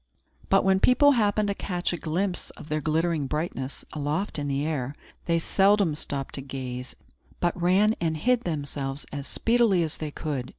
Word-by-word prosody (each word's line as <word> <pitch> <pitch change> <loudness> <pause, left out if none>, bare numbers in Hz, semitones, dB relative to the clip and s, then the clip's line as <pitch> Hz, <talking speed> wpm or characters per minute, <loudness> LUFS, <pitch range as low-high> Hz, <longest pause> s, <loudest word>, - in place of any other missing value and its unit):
But 195 - +5
when 190 0 +4
people 285 +7 +6
happened 210 -4 +2
to - - +1
catch 180 -3 -2
a - - 0
glimpse 175 +4 -2
of - - -12
their 155 0 0
glittering 160 -1 0
brightness, 145 -2 -3
aloft 150 +5 -2
in 145 - -2
the 140 +1 0
air, 145 -3 -2 0.3
they 170 -1 +2
seldom 195 0 +3
stopped 140 -2 -4
to 135 - -4
gaze, 130 -2 -6 0.4
but 175 -1 +1
ran 195 +5 +4
and 160 -2 0
hid 245 +7 +2
themselves 145 - -4
as 140 -1 -5
speedily 225 -6 +3
as 155 - -3
they 155 - -4
could. 145 -4 -4
160 Hz, 175 wpm, -26 LUFS, 145-195 Hz, 0.4 s, people